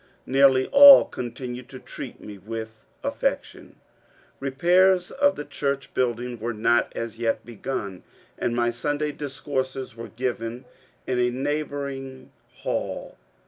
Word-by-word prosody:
Nearly 135 -1 +4
all 280 0 +10
continued 125 0 -7
to 130 - -9
treat - - -9
me 105 -1 -10
with 110 +1 -8 0.2
affection. - - -3 0.7
Eepairs 175 +7 +3
of 285 +1 +2
the 150 - -6
church 140 -2 -3
building 120 -1 -1
were 115 +1 -3
not 120 +2 +2
as 115 -1 -5
yet 115 -1 -1
begun, 105 -5 -5 0.3
and 120 - -2
my 120 0 +1
Sunday 145 +5 -2
discourses 135 -3 -4
were 115 0 -7
given 120 0 -4 0.4
in 125 -1 -1
a 125 0 +3
neighbouring 135 -1 -4 0.3
hall. - - -3
130 Hz, 125 wpm, -25 LUFS, 120-140 Hz, 0.7 s, all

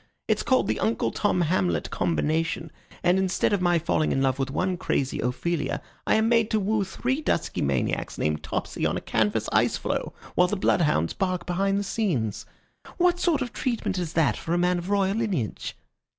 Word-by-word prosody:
It's - - +2
called 260 -1 +2
the - - 0
Uncle 225 - 0
Tom 200 -4 +1
Hamlet 175 +2 0
Combination, 160 0 0 0.3
and 180 +2 +4
instead 190 +2 +1
of 200 - +1
my 175 -1 +3
falling 155 -1 +1
in - - +1
love 135 0 +1
with 135 0 -1
one 185 +6 0
crazy 135 -5 -1
Ophelia, 150 +6 -1 0.3
I - - +4
am 220 +1 +3
made 230 -2 +3
to 220 - +2
woo 210 +1 +1
three 250 +9 -2
dusky 235 - -1
maniacs 70 -2 -1
named 75 0 0
Topsy - - -4
on - - +1
a - - -1
canvas 110 -2 0
ice - - +3
floe, - - -3 0.2
while 180 - +4
the 210 - -2
blood 185 - +2
hounds 85 - +1
bark 185 -2 -1
behind 195 +2 +1
the 200 - 0
scenes. 155 - -1 0.5
What 355 0 +3
sort 315 -7 +2
of 245 - -7
treatment 235 -7 -1
is 170 -3 -3
that 145 -10 +3
for 165 - -2
a - - +2
man 180 0 +2
of 175 +2 -6
royal 200 0 +2
lineage?" 190 - -2
180 Hz, 195 wpm, -26 LUFS, 155-210 Hz, 0.5 s, and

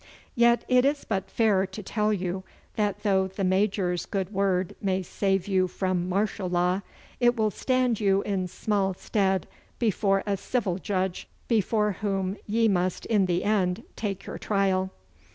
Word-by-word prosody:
Yet 235 -1 +4
it 250 -1 +4
is 285 +1 +1
but 195 -2 -2
fair 200 -4 +2
to 190 +3 -8
tell 210 +2 0
you 190 -2 -2 0.3
that 205 -2 -1
though 190 -2 +2
the 190 +1 -5
Major's 185 -2 +1
good 195 0 -3
word 190 -2 0
may 190 -1 0
save 195 0 0
you 190 -2 +2
from 185 -1 -1
martial 195 0 -1
law, 180 +2 +1 0.4
it 240 0 +4
will 215 -2 +1
stand 255 0 +1
you 195 -2 +2
in 190 -3 -1
small 195 +1 -1
stead 190 -2 0 0.3
before 200 -3 +1
a 200 -1 0
civil 195 -4 -1
judge, 185 -2 -2 0.2
before 210 -1 +2
whom 195 -2 -1
ye 225 +2 +3
must 185 -3 0
in 205 -4 +2
the 175 0 0
end 200 -1 +1
take 195 -3 -4
your - - -6
trial. 190 -2 +1
195 Hz, 160 wpm, -27 LUFS, 185-210 Hz, 0.4 s, Yet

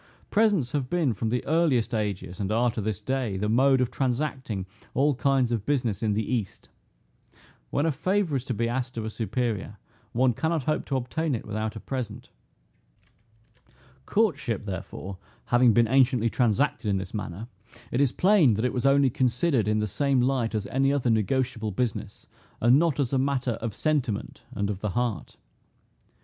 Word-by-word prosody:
Presents 205 - +2
have 135 -4 -2
been, 160 -8 +1
from 110 +2 -2
the 125 +2 -1
earliest 140 -8 +2
ages, 100 -5 -3
and 100 0 -2
are 120 +2 +2
to 110 - -4
this 105 -2 -3
day, 130 -7 -1
the 105 +2 -1
mode 130 +4 +4
of 125 -1 0
transacting 130 -6 -2 0.3
all 145 +2 +3
kinds 130 -2 +1
of 115 -4 -1
business 120 -7 -1
in 110 -2 +1
the 110 +1 -1
east. 115 -7 -3 1.0
When 145 - 0
a 165 - +2
favor 180 +2 0
is 130 - -1
to 130 - -2
be 115 +2 0
asked 125 +1 -3
of 110 - -2
a 110 - -4
superior, 110 -3 -2 0.3
one 125 +1 +2
cannot 160 +4 -1
hope 155 +4 -1
to 135 - -2
obtain 135 +4 -1
it 115 - -6
without 110 +1 -3
a - - -5
present. 125 -5 -5 1.8
Courtship, 150 - 0
therefore, 95 0 -6 0.3
having 120 0 +4
been 115 +1 +4
anciently 125 -2 +3
transacted 120 0 +1
in 100 - +2
this 95 0 -6
manner, 105 0 -5 0.4
it 125 - +1
is 140 -4 +3
plain, 180 - +4
that 110 +4 -1
it 125 - 0
was 125 +1 +1
only 140 -1 +4
considered 125 - +1
in 105 0 +2
the 105 - +1
same 140 +6 +1
light 125 -3 +1
as 105 -2 -1
any 135 +4 +1
other 130 -4 +1
negotiable 115 +1 0
business, 110 +2 -3 0.3
and 120 +4 +5
not 165 -3 +1
as 140 -2 0
a 135 - +3
matter 135 -2 0
of 110 -3 -4
sentiment, 135 -9 -1
and 100 0 -1
of 95 - -5
the 105 - -2
heart. 120 -10 -2
125 Hz, 180 wpm, -26 LUFS, 110-135 Hz, 1.8 s, and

